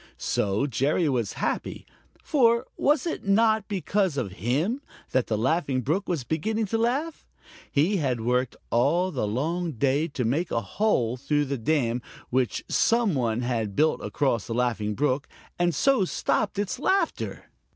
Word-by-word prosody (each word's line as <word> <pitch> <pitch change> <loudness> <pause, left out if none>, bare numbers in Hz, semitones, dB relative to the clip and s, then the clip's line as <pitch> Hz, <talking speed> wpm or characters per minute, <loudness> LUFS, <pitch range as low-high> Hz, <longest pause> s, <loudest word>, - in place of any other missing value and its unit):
So 100 +6 0
Jerry 145 +6 +1
was 120 -7 0
happy, - - -3 0.4
for 235 -6 +3
was 295 +1 +2
it 335 - -3
not 220 +1 +3
because 195 -4 0
of 115 -8 -2
him 145 - -1 0.3
that 130 -2 +1
the 110 - 0
Laughing 135 +2 +1
Brook 170 - -1
was 165 -7 -1
beginning 215 - -1
to 225 - +2
laugh? 275 +8 -1 0.4
He 170 +8 +2
had 130 -7 0
worked 125 +2 0 0.2
all 175 +10 +2
the 125 -9 -1
long 160 +9 -1
day 140 +5 +1
to 135 -6 -3
make 155 +9 0
a - - 0
hole 130 - 0
through 145 +3 0
the 140 -2 -3
dam 125 -2 +1 0.3
which 125 -3 0
some 230 -4 +2
one 120 -4 0
had 115 -5 -2
built 155 +1 +2
across 130 -7 0
the 115 - -3
Laughing 115 -4 0
Brook 140 +1 0 0.3
and 175 0 +3
so 275 -7 +3
stopped 205 +3 -1
its 205 +3 -2
laughter. 385 +7 -1
145 Hz, 160 wpm, -26 LUFS, 125-200 Hz, 0.4 s, for